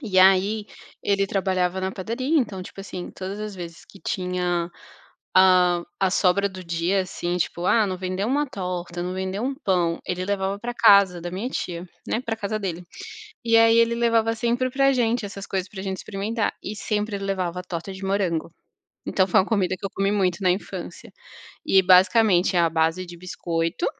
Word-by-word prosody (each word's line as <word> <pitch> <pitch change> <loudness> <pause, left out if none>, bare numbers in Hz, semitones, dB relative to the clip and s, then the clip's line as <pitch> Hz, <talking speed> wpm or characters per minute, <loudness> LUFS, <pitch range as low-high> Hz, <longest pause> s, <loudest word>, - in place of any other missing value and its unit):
e 205 -8 0
aí 195 +3 +5 0.4
ele 200 -1 +1
trabalhava 190 -2 0
na 190 0 -2
padaria, 255 - -1
então, 205 -7 -2
tipo, 190 - -10
assim, 185 -2 -7
todas 190 +2 -6
as 215 -1 -5
vezes 170 -2 -9
que 195 - -16
tinha, 180 -2 -1 0.7
ah, 180 -2 +5 0.2
a 190 -1 +2
sobra 200 +2 +3
do 185 -1 -9
dia, 170 +3 0
assim, 175 -1 -3
tipo: 175 0 -2
"Ah, 220 +3 +4
não 185 -1 -3
vendeu 185 +2 -2
uma 290 +3 +1
torta, 180 -6 -4
não 180 +1 -3
vendeu 190 +3 -3
um 275 +2 -1
pão", 180 - 0
ele 180 0 -2
levava 195 0 -1
pra 240 +3 -5
casa 200 -6 +6
da 175 - -4
minha 195 +7 -3
tia, 175 -8 -5 0.2
né, 230 - -1
pra 230 -3 -3
casa 215 0 -3
dele. 180 -4 -4 0.6
E 230 -1 +4
aí 225 0 +6
ele 230 0 +4
levava 230 -1 +2
sempre 240 +3 0
pra 275 +1 +3
gente 235 -2 +1
essas 200 0 -7
coisas 190 -1 -2
pra 190 -1 -8
gente 190 -1 -3
experimentar 210 +4 -2
e 205 - -4
sempre 210 0 -2
levava 185 -3 -2
torta 180 +1 -5
de 190 +1 -9
morango, 190 -5 0 0.6
então 190 0 +2
foi - - +4
uma - - -4
comida 190 -5 0
que - - -7
eu - - -2
comi 195 0 +1
muito 190 -3 0
na 185 - +3
infância 185 - -6 0.5
e 190 - +5
basicamente, 185 0 +5
é - - +5
a 170 - +4
base 165 +3 0
de 175 0 -10
biscoito 170 - -2
190 Hz, 190 wpm, -24 LUFS, 180-210 Hz, 0.7 s, casa